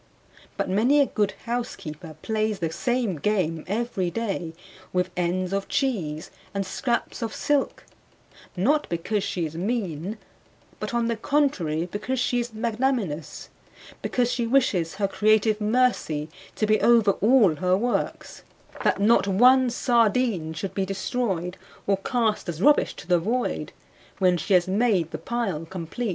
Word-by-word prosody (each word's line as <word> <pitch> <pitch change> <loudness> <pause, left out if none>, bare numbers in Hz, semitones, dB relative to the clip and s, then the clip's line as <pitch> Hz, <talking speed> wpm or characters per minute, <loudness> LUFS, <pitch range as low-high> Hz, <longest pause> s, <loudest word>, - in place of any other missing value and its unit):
But - - -1
many 230 +10 +3
a 285 - +5
good 210 -6 -1
housekeeper 170 -10 -5
plays 215 -1 0
the 165 -3 -2
same 240 -2 -1
game 165 -2 0
every 205 -3 -1
day 190 -6 -3 0.4
with 180 0 0
ends 180 +1 -1
of 195 0 -1
cheese 175 - -2 0.2
and 195 0 -1
scraps 235 +7 -2
of 225 -1 -3
silk, 290 -2 0 0.7
not 290 +12 +2
because 190 +5 -1
she 175 -3 -2
is 155 0 -6
mean, 190 -1 -2 0.6
but - - -4
on 235 -1 +1
the 230 - 0
contrary, 215 - 0
because 210 +8 -3
she 245 0 +1
is 240 0 -3
magnanimous; 220 - -2 0.5
because 245 -1 0
she 235 -2 -1
wishes 195 -10 +2
her 200 0 0
creative 215 +1 +2
mercy 210 -10 +1 0.3
to 215 - +1
be 215 0 +2
over 230 -4 +5
all 210 - +5
her 185 +2 +2
works, 240 +4 -2 0.4
that - - +2
not 210 0 +4
one 250 +6 +5
sardine 230 -7 +1
should 175 +5 -5
be 195 - 0
destroyed, 190 -2 -2 0.3
or 195 -1 +2
cast 220 -1 -1
as 160 -2 -4
rubbish 295 +9 +4
to - - -10
the 175 -1 +3
void, 235 +8 -2 0.5
when 185 -2 +3
she 185 +3 +1
has 180 0 +3
made 195 -4 +1
the - - -5
pile 215 -10 -2
complete. 190 +7 -4
210 Hz, 150 wpm, -25 LUFS, 180-240 Hz, 0.7 s, a